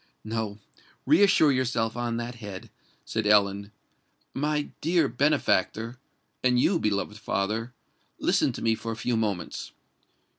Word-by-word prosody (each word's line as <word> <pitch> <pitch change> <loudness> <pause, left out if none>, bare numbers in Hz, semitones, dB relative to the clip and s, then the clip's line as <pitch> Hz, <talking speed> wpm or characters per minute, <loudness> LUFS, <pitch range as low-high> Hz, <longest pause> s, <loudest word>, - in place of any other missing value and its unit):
"No—reassure 115 - +1
yourself 120 -4 0
on 120 -1 -2
that 120 +1 -4
head," 105 -2 -9 0.3
said 110 -2 -1
Ellen. 100 -1 +3 0.6
"My 150 +1 -1
dear 165 -1 +3
benefactor—and 125 -1 0
you, 170 +6 +3
beloved 105 -2 -1
father—listen 110 +6 -2
to - - -7
me 115 - +3
for 115 +1 -4
a - - -3
few 120 +2 -1
moments. 105 -5 -3
115 Hz, 110 wpm, -27 LUFS, 105-130 Hz, 0.6 s, Ellen